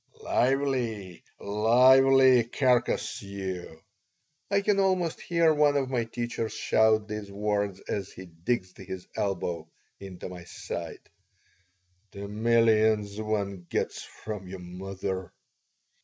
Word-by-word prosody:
"Lively, 125 -8 0 0.2
lively, 130 +4 +5
carcass 125 0 +1
you!" 95 -4 -6 0.7
I 200 0 +2
can 200 0 +2
almost 185 -4 +1
hear 170 -2 +3
one 145 -1 +3
of 135 -2 -1
my 120 -3 0
teachers 115 -1 -4
shout 110 -1 +3
these 105 -2 -6
words 100 -1 -1
as 100 -1 -4
he 95 - -10
digs 90 +3 -3
his 95 -1 -8
elbow 90 -4 -2 0.3
into 95 -2 -8
my 90 -2 -9
side. - - -7 1.1
"The 100 0 -6
millions 110 -1 +2
one 100 -4 -3
gets - - -2
from 105 -4 -8
your 95 +1 -7
mother!" 95 +1 -5
105 Hz, 110 wpm, -28 LUFS, 95-125 Hz, 1.1 s, lively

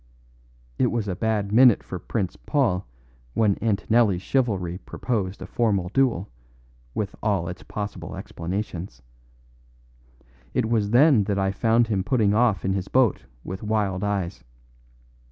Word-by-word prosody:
It - - +4
was 115 -3 -1
a 95 - -2
bad 105 -1 -1
minute 120 0 +6
for 90 - -6
Prince 95 0 -3
Paul 120 - 0 0.5
when 105 -3 +3
Antonelli's 105 -2 +2
chivalry 95 -9 0
proposed 100 -6 -3
a - - -6
formal 100 -7 0
duel, 120 -5 +1 0.7
with 100 -1 -3
all 100 -5 0
its 90 -1 -6
possible 105 -1 -6
explanations. 85 - -5 1.5
It 125 -3 +2
was 110 -3 +1
then 125 -2 +5
that 100 -1 -1
I 95 0 +1
found 115 +4 +3
him 100 -4 -1
putting 105 -1 +2
off 110 -4 +2
in 95 - +1
his 95 -1 -2
boat 130 -5 +2 0.2
with 95 +1 -6
wild 105 -3 -1
eyes. 95 -8 -2
105 Hz, 135 wpm, -24 LUFS, 95-115 Hz, 1.5 s, minute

